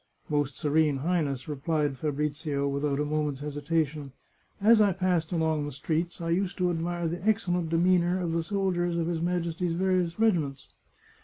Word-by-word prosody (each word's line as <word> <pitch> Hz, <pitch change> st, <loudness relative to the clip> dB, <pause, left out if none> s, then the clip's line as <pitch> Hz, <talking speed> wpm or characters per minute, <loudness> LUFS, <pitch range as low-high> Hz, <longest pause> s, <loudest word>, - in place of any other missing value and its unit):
" -, -, -46 dB
" -, -, -33 dB
Most 145 Hz, -2 st, 0 dB
Serene 150 Hz, -1 st, +2 dB
Highness," 145 Hz, -4 st, -1 dB
replied 150 Hz, -1 st, -1 dB
Fabrizio, 145 Hz, 0 st, -2 dB
without 140 Hz, 0 st, -1 dB
a 150 Hz, -, +1 dB
moment's 150 Hz, -2 st, -1 dB
hesitation, 150 Hz, -1 st, -2 dB, 0.2 s
" -, -, -39 dB
as 215 Hz, +2 st, +6 dB
I 200 Hz, -2 st, +4 dB
passed 180 Hz, -3 st, 0 dB
along 160 Hz, -3 st, 0 dB
the -, -, -5 dB
streets 160 Hz, +5 st, -2 dB
I 165 Hz, -1 st, -2 dB
used 185 Hz, +2 st, 0 dB
to 180 Hz, -2 st, +1 dB
admire 170 Hz, 0 st, -2 dB
the 170 Hz, +2 st, -4 dB
excellent 180 Hz, -6 st, +1 dB
demeanour 175 Hz, +2 st, +3 dB
of 175 Hz, -2 st, -2 dB
the 165 Hz, 0 st, 0 dB
soldiers 175 Hz, -2 st, 0 dB
of 165 Hz, -, 0 dB
his 165 Hz, -1 st, -2 dB
Majesty's 170 Hz, 0 st, -1 dB
various 180 Hz, -2 st, +1 dB
regiments. 160 Hz, -12 st, +1 dB
165 Hz, 175 wpm, -28 LUFS, 150-175 Hz, 0.2 s, as